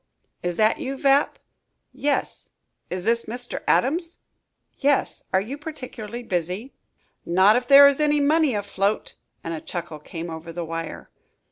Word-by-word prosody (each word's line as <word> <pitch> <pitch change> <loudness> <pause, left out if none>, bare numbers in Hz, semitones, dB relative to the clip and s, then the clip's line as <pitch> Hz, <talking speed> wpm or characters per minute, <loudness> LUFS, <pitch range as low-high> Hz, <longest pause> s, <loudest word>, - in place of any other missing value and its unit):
"Is 175 -1 -3
that 215 0 +3
you, 270 +1 -4
Vapp?" 275 +1 +3 0.6
"Yes. 285 0 -2 0.4
Is 180 0 -4
this 230 +2 +1
Mr. 245 +2 -4
Adams?" 330 +6 +1 0.6
"Yes. 285 -1 +1
Are 190 - +4
you 250 +9 -6
particularly 245 -7 -7
busy?" 185 +6 -3 0.5
"Not 190 +5 +4
if 245 0 0
there 280 +1 +10
is 280 0 +2
any 295 -1 +3
money 295 -2 +3
afloat," 200 0 -1 0.3
and 165 - -4
a 160 - -5
chuckle 170 -3 -6
came 165 +2 -7
over 160 +1 -7
the 170 0 -5
wire. 165 0 -6
225 Hz, 145 wpm, -24 LUFS, 175-280 Hz, 0.6 s, there